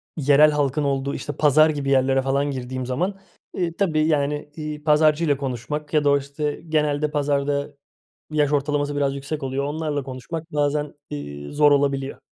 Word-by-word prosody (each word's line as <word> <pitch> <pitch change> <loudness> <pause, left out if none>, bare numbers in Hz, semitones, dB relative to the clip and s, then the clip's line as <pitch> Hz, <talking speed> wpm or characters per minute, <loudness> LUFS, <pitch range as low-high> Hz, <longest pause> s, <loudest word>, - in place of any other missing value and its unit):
yerel 145 0 +5
halkın 145 0 0
olduğu, 140 0 -1
işte, 145 - -5
pazar 155 +2 +5
gibi 145 -3 -2
yerlere 135 0 +3
falan 140 +2 0
girdiğim 130 -1 -4
zaman, 180 +10 -2 0.3
eee, 170 -2 -2
tabii, 155 -6 +2
yani, 150 -1 0
iii, 150 -1 -6
pazarcıyla 150 -1 +3
konuşmak 140 +3 -4
ya 150 -1 +3
da 145 - +3
o, 140 - +5
işte, 145 +1 -4
genelde 150 -1 +1
pazarda 145 0 -1 0.6
yaş 150 -1 +1
ortalaması 145 0 0
biraz 140 -1 0
yüksek 140 +2 -5
oluyor. 135 +1 -2
Onlarla 150 -1 -2
konuşmak 150 +6 -7
bazen, 145 0 0 0.2
iii, 70 0 -7
zor 145 0 +5
olabiliyor. 140 -1 +1
145 Hz, 160 wpm, -23 LUFS, 140-150 Hz, 0.6 s, yerel